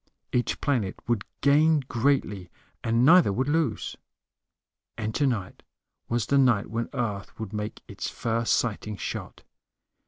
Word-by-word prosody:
Each 125 Hz, -1 st, 0 dB
planet 120 Hz, -10 st, 0 dB
would 120 Hz, -4 st, 0 dB, 0.2 s
gain 150 Hz, +2 st, +5 dB
greatly, 115 Hz, -7 st, 0 dB, 0.3 s
and 115 Hz, +2 st, +3 dB
neither 170 Hz, -, +7 dB
would 130 Hz, +7 st, -1 dB
lose. 145 Hz, -8 st, 0 dB, 1.0 s
And 110 Hz, 0 st, -3 dB
tonight 120 Hz, -10 st, -1 dB, 0.5 s
was 120 Hz, -2 st, 0 dB
the 140 Hz, -, +3 dB
night 120 Hz, -6 st, +3 dB
when 115 Hz, 0 st, -2 dB
Earth 105 Hz, -5 st, -4 dB
would 110 Hz, -2 st, -5 dB
make 105 Hz, 0 st, -5 dB
its -, -, -5 dB
first 115 Hz, 0 st, 0 dB
sighting 105 Hz, -2 st, -1 dB
shot. -, -, -6 dB
115 Hz, 130 wpm, -27 LUFS, 105-140 Hz, 1.0 s, neither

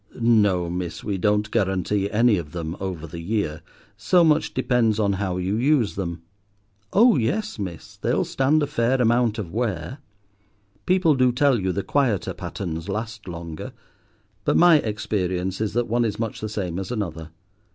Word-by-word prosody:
No, 105 Hz, -7 st, +3 dB
miss, 90 Hz, 0 st, -4 dB
we 100 Hz, -3 st, -2 dB
don't 105 Hz, +2 st, +1 dB
guarantee 95 Hz, +1 st, 0 dB
any 110 Hz, 0 st, +3 dB
of 75 Hz, -4 st, -6 dB
them 85 Hz, -1 st, -4 dB
over 90 Hz, -4 st, -4 dB
the 85 Hz, +1 st, -8 dB
year, 85 Hz, -4 st, -2 dB, 0.3 s
so 175 Hz, -, +3 dB
much 155 Hz, -1 st, +3 dB
depends 120 Hz, -4 st, +2 dB
on 100 Hz, -2 st, +2 dB
how 95 Hz, -2 st, -2 dB
you 95 Hz, +3 st, -1 dB
use 130 Hz, -3 st, +2 dB
them. 85 Hz, -3 st, -5 dB, 0.7 s
Oh 230 Hz, -2 st, +5 dB
yes, 195 Hz, -, -1 dB
miss, 90 Hz, -5 st, -7 dB
they'll -, -, 0 dB
stand 145 Hz, +3 st, +2 dB
a -, -, +2 dB
fair 125 Hz, 0 st, 0 dB
amount 120 Hz, -2 st, +2 dB
of 95 Hz, -7 st, -5 dB
wear. 115 Hz, -, -2 dB, 0.9 s
People 180 Hz, -4 st, +4 dB
do 130 Hz, -2 st, +3 dB
tell 130 Hz, 0 st, +3 dB
you 95 Hz, -1 st, 0 dB
the 100 Hz, +2 st, -2 dB
quieter 125 Hz, -10 st, 0 dB
patterns 85 Hz, -1 st, -5 dB
last 110 Hz, +1 st, -5 dB
longer; 85 Hz, -2 st, -7 dB, 0.7 s
but -, -, +2 dB
my 175 Hz, -2 st, +7 dB
experience 95 Hz, -4 st, -2 dB
is 110 Hz, -2 st, -1 dB
that 120 Hz, +1 st, 0 dB
one 120 Hz, +1 st, +1 dB
is 105 Hz, -3 st, -1 dB
much 115 Hz, -2 st, -4 dB
the 110 Hz, -, -3 dB
same 95 Hz, -4 st, -3 dB
as 95 Hz, -, -5 dB
another. 85 Hz, -9 st, -4 dB
105 Hz, 170 wpm, -23 LUFS, 90-120 Hz, 0.9 s, my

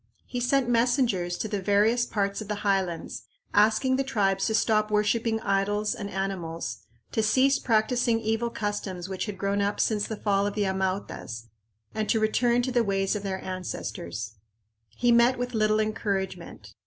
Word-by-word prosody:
He 245 Hz, -, -4 dB
sent 250 Hz, +1 st, +2 dB
messengers 235 Hz, -7 st, +1 dB
to -, -, -3 dB
the 205 Hz, -2 st, -3 dB
various 210 Hz, +5 st, +3 dB
parts 200 Hz, 0 st, -1 dB
of 215 Hz, -, -7 dB
the 210 Hz, -1 st, -4 dB
highlands, 190 Hz, -4 st, -1 dB, 0.3 s
asking 220 Hz, +5 st, +3 dB
the 270 Hz, -, +1 dB
tribes 195 Hz, -7 st, +1 dB
to 220 Hz, -, 0 dB
stop 215 Hz, -1 st, +2 dB
worshiping 220 Hz, +2 st, +1 dB
idols 205 Hz, +1 st, 0 dB
and 200 Hz, -, -6 dB
animals, 185 Hz, -4 st, -4 dB, 0.3 s
to 225 Hz, -, +1 dB
cease 260 Hz, +6 st, +3 dB
practicing 230 Hz, 0 st, +2 dB
evil 225 Hz, +1 st, -1 dB
customs 205 Hz, -5 st, -4 dB
which 190 Hz, +3 st, -4 dB
had 205 Hz, -2 st, -5 dB
grown 200 Hz, +1 st, 0 dB
up 200 Hz, +1 st, -1 dB
since 210 Hz, -2 st, +1 dB
the 220 Hz, -, -5 dB
fall 200 Hz, -1 st, +1 dB
of 205 Hz, -, -4 dB
the 210 Hz, -1 st, +1 dB
Amautas, 190 Hz, -, -3 dB, 0.4 s
and 215 Hz, -1 st, -2 dB
to 225 Hz, -, +3 dB
return 235 Hz, +3 st, +2 dB
to 255 Hz, -, -1 dB
the 240 Hz, -1 st, +3 dB
ways 195 Hz, -1 st, 0 dB
of 210 Hz, -, -3 dB
their 190 Hz, -1 st, -4 dB
ancestors. 110 Hz, -, -5 dB, 0.5 s
He 240 Hz, -, +1 dB
met 235 Hz, +2 st, +5 dB
with 245 Hz, 0 st, -3 dB
little 215 Hz, -1 st, +2 dB
encouragement. 195 Hz, -5 st, -3 dB
210 Hz, 170 wpm, -27 LUFS, 195-230 Hz, 0.5 s, met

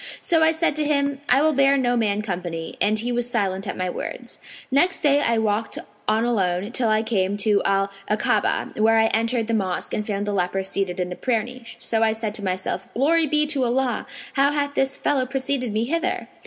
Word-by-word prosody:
So 330 Hz, -2 st, +2 dB
I 320 Hz, 0 st, +5 dB
said 320 Hz, -2 st, 0 dB
to 305 Hz, -, +1 dB
him, 280 Hz, -2 st, 0 dB
'I 270 Hz, +3 st, +5 dB
will 315 Hz, 0 st, +3 dB
bear 275 Hz, 0 st, +4 dB
no 245 Hz, -2 st, +1 dB
man 210 Hz, -3 st, 0 dB
company'; 175 Hz, -4 st, -5 dB
and 215 Hz, +1 st, +3 dB
he 235 Hz, +3 st, -2 dB
was 240 Hz, 0 st, -1 dB
silent 195 Hz, -5 st, -1 dB
at -, -, -4 dB
my 185 Hz, -, -1 dB
words. 180 Hz, -, -6 dB, 0.3 s
Next 350 Hz, +8 st, +3 dB
day 290 Hz, -2 st, +4 dB
I 230 Hz, -4 st, +1 dB
walked 220 Hz, 0 st, -1 dB, 0.3 s
on 220 Hz, +2 st, +2 dB
alone, 195 Hz, -3 st, 0 dB
till 240 Hz, -2 st, +1 dB
I 215 Hz, 0 st, +2 dB
came 200 Hz, -3 st, 0 dB
to 205 Hz, 0 st, +2 dB
Al 195 Hz, 0 st, +1 dB, 0.2 s
Akabah,[FN#503] 215 Hz, 0 st, 0 dB
where 225 Hz, +1 st, +4 dB
I 220 Hz, -, +4 dB
entered 230 Hz, +1 st, +1 dB
the 230 Hz, -, -2 dB
mosque 190 Hz, -5 st, -2 dB
and 210 Hz, -, -2 dB
found 205 Hz, -1 st, -2 dB
the 205 Hz, -, -2 dB
leper 190 Hz, 0 st, -1 dB
seated 190 Hz, -1 st, -2 dB
in 180 Hz, 0 st, -2 dB
the -, -, -4 dB
prayer 230 Hz, -1 st, 0 dB
niche. 250 Hz, -1 st, -10 dB
So 225 Hz, -1 st, -1 dB
I 220 Hz, -1 st, +3 dB
said 220 Hz, -1 st, -4 dB
to 210 Hz, -, -4 dB
myself, 185 Hz, 0 st, -3 dB
'Glory 315 Hz, +6 st, +3 dB
be 300 Hz, +1 st, +3 dB
to 285 Hz, -3 st, 0 dB
Allah! 250 Hz, +1 st, 0 dB, 0.3 s
how 280 Hz, 0 st, +3 dB
hath 285 Hz, -1 st, -1 dB
this 270 Hz, -1 st, 0 dB
fellow 265 Hz, -3 st, 0 dB
preceded 260 Hz, -2 st, -1 dB
me 215 Hz, +2 st, 0 dB
hither?' 335 Hz, +8 st, -1 dB
230 Hz, 220 wpm, -23 LUFS, 205-275 Hz, 0.3 s, I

